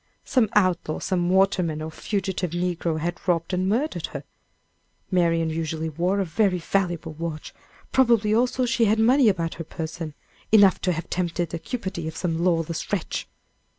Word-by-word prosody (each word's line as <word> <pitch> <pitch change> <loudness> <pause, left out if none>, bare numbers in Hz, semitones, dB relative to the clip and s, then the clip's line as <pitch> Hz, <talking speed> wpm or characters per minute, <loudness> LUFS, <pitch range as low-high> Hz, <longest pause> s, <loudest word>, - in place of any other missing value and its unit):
Some 240 -5 +2
outlaw, 185 -6 +2
some 175 -2 -1
waterman, 185 -4 +2
or 155 +1 -5
fugitive 190 +1 -2
negro 175 -1 -1
had 170 +2 -3
robbed 170 0 +1
and 185 +1 +1
murdered 265 +9 -1
her. - - -7 0.9
Marian 165 -3 +2
usually 160 0 -2
wore 175 +6 0
a 195 - +1
very 180 +2 +1
valuable 175 -2 -1
watch; 160 -1 -6 0.4
probably, 230 -5 +3
also, 250 +2 +2
she 235 -1 +2
had 215 +1 +3
money 240 +2 +5
about 165 -4 -1
her - - -3
person 160 -1 -6 0.4
enough 205 -3 +6
to 185 - +1
have 165 -1 -4
tempted 175 -1 -1
the 170 - -4
cupidity 190 -7 -4
of 160 - -6
some 170 -2 -1
lawless 165 -2 0
wretch. 195 -5 -2
180 Hz, 160 wpm, -24 LUFS, 165-200 Hz, 0.9 s, enough